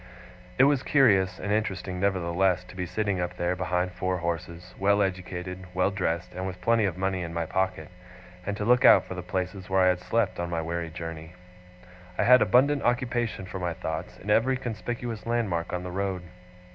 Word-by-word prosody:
It 135 - +6
was 140 -1 +4
curious 95 -12 +3
and 100 - -3
interesting, 95 -4 -1
nevertheless, 90 -1 +1
to - - -14
be 90 -1 -3
sitting 100 0 -1
up 90 0 -4
there 85 +1 0
behind 90 0 -1
four 90 0 -2
horses: 85 +1 -4
well 100 +1 +3
educated, 90 -1 -4
well 95 +2 +2
dressed, 90 -3 -2
and 95 +1 -4
with 90 -1 -6
plenty 115 -2 +2
of 90 -3 -2
money 95 0 -1
in 85 -1 -5
my 85 -1 -1
pocket; 95 -2 -1 0.5
and 100 +2 -3
to 105 - -2
look 125 +2 +4
out - - +7
for - - -6
the 90 - -5
places 95 +1 -4
where 95 0 +3
I 90 - +5
had 90 -1 +1
slept 105 -1 0
on 85 0 -2
my 85 -1 -1
weary 85 +1 -3
journey. 80 0 -7 0.8
I - - +2
had 125 0 +7
abundant 140 +3 +4
occupation 120 -4 -1
for 95 +1 -6
my 90 -1 -2
thoughts, 80 -3 -5
in 105 - -4
every 130 +5 +3
conspicuous 120 -1 -5
landmark 100 -8 -1
on 90 -1 -3
the 90 - -6
road. 95 -1 -2
95 Hz, 195 wpm, -27 LUFS, 90-105 Hz, 0.8 s, out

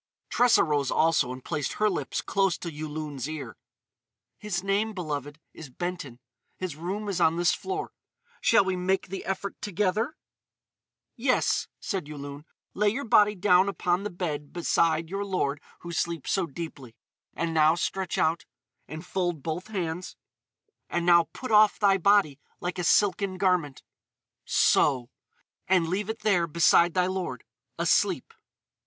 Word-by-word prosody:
Tressa 245 -1 +5
rose 145 -4 0
also 160 -6 +2
and 130 0 -9
placed 150 -5 -2
her 215 - +1
lips 160 -9 -2
close 195 -2 +1
to 170 - -6
Yulun's 150 -2 -5
ear: 140 -9 -6 0.8
"His 195 -4 -3
name, 205 +3 0
beloved, 150 -5 -5
is 155 -4 -10
Benton. 145 -4 -5 0.4
His 185 -5 -4
room 190 +7 -4
is 195 -3 -2
on 160 - +4
this 175 +1 +2
floor. 390 +1 -4 0.5
Shall 225 -4 +4
we 190 -1 0
make 185 +1 -1
the 195 +1 -5
effort 195 +1 -4
together?" 210 - -1 1.0
"Yes," 255 +1 +1
said 190 -8 -3
Yulun. 145 0 -8 0.3
"Lay 210 +1 +2
your 265 +7 -3
body 210 -1 +4
down 185 0 +4
upon 180 -2 0
the 210 - -3
bed 155 -6 -4
beside 165 -1 +1
your 195 +4 -3
lord 150 -8 -1 0.2
who 175 - -7
sleeps 170 -2 -2
so 190 -3 +1
deeply.... 140 -6 -8 0.4
And 165 -1 -2
now 155 0 +4
stretch 185 +1 -2
out.... 160 +2 +1 0.4
And 155 +3 -8
fold 175 -6 -2
both 165 +4 -4
hands.... 180 -4 -4 0.7
And 175 0 -1
now 170 -1 +6
put 255 - -7
off 210 -1 +6
thy 195 -2 +3
body 190 -7 +3 0.2
like 180 +1 -4
a - - -1
silken 195 +1 +2
garment.... 180 -8 0 0.6
So! 130 -3 +3 0.6
And 180 -3 +3
leave 195 +5 -2
it 220 +1 -4
there 180 -6 +2
beside 170 +1 +4
thy 180 -1 +3
lord, 180 -10 -3 0.3
asleep." - - +1
175 Hz, 150 wpm, -27 LUFS, 155-195 Hz, 1.0 s, now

